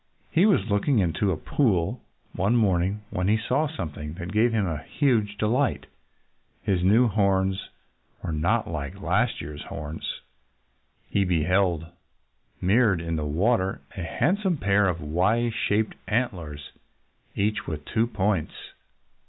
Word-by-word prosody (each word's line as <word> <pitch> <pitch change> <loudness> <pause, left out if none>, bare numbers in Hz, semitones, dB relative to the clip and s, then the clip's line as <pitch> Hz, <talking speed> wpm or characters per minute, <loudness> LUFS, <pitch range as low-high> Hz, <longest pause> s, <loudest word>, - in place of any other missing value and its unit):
He 185 +6 +4
was 115 - +3
looking 110 +5 +2
into 95 +1 +1
a 85 - -1
pool 95 - 0 0.3
one 100 +6 +1
morning 100 -2 +1
when 90 +1 -1
he 110 +2 +4
saw 130 +7 0
something 80 - -6
that 85 0 -6
gave 110 +3 +3
him 110 -3 +1
huge 110 - 0
delight. 120 +6 +1 0.8
His 90 -3 +1
new 110 +6 +5
horns 95 -2 +1 0.5
were - - -2
not 85 +9 +1
like 75 -4 -5
last - - +1
year's 75 0 -7
horns. 75 +2 -6 0.9
He 100 - +2
beheld, 90 -1 +1 0.7
mirrored 100 0 +3
in 85 0 -3
the 75 -1 -2
water, 95 - +1
a 95 - -5
handsome 180 - 0
pair 100 -3 +3
of 85 -3 -1
Y 100 +10 +1
shaped 110 -1 0
antlers, 85 - -2 0.6
each 105 +2 -1
with 75 -2 -5
two 115 +1 +1
points! 100 -6 0
100 Hz, 135 wpm, -26 LUFS, 85-115 Hz, 0.9 s, new